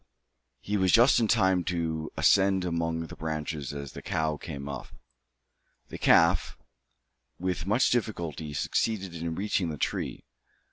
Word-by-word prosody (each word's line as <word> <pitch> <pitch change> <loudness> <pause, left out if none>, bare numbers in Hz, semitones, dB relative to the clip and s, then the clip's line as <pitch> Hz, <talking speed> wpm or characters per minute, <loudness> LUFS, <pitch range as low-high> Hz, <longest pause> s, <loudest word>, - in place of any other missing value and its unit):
He 105 +1 -1
was 95 -2 +2
just 120 +3 +6
in 115 - +2
time 95 -5 +3
to 80 -3 -2
ascend 95 -1 +4
among 85 -1 -1
the - - -10
branches 75 -2 -4
as 70 -2 -6
the - - -9
cow 80 -1 -1
came 70 -2 -7
up. 70 - -6 1.0
The - - -8
calf, 85 +1 +4 0.8
with 90 -1 -3
much 110 +6 +3
difficulty, 85 - -2
succeeded 95 +3 -1
in 85 0 -4
reaching 95 -2 -1
the 75 - -5
tree. - - -3
85 Hz, 140 wpm, -28 LUFS, 80-95 Hz, 1.0 s, just